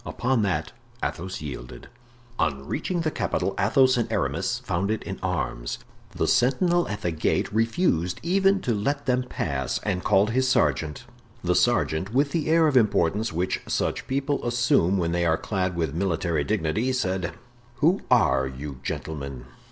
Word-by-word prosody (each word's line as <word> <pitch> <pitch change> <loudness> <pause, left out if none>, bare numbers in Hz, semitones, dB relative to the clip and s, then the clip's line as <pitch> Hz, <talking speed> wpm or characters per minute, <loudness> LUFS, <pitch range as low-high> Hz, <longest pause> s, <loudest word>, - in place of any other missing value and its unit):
Upon 125 -1 0
that, 85 -7 -1 0.3
Athos 95 0 -3
yielded. 60 -5 -8 0.5
On 70 -3 0
reaching 175 - -2
the 155 -1 0
capital 100 - -1
Athos 130 +5 +4
and 120 - -1
Aramis - - 0
found 95 +4 -1
it 110 - -1
in 95 - -6
arms. 65 -10 -2 0.4
The - - -1
sentinel 170 +8 +3
at 105 - -5
the 85 - -1
gate 80 +5 0
refused 110 - +1
even 195 +3 +3
to 120 - 0
let 140 +8 -1
them 125 -1 +2
pass, 70 - -2
and 95 -3 -1
called 100 +3 +3
his 130 +2 +2
sergeant. 75 - +1 0.4
The 90 0 +2
sergeant, 100 -3 +1
with 140 +1 +3
the 160 -1 -1
air 165 0 +5
of 145 - +1
importance 105 -2 +2
which 90 +3 -1
such - - -1
people 140 +2 -1
assume 120 -6 +2
when 85 -2 0
they 85 0 +1
are 80 -1 +2
clad 95 -3 -2
with 80 -4 -1
military 85 -3 0
dignity, 105 - 0
said: 95 -7 -1 0.4
"Who 165 +10 +2
are 65 - +4
you, 65 +1 -7
gentlemen?" 70 -3 -5
100 Hz, 160 wpm, -25 LUFS, 80-125 Hz, 0.5 s, air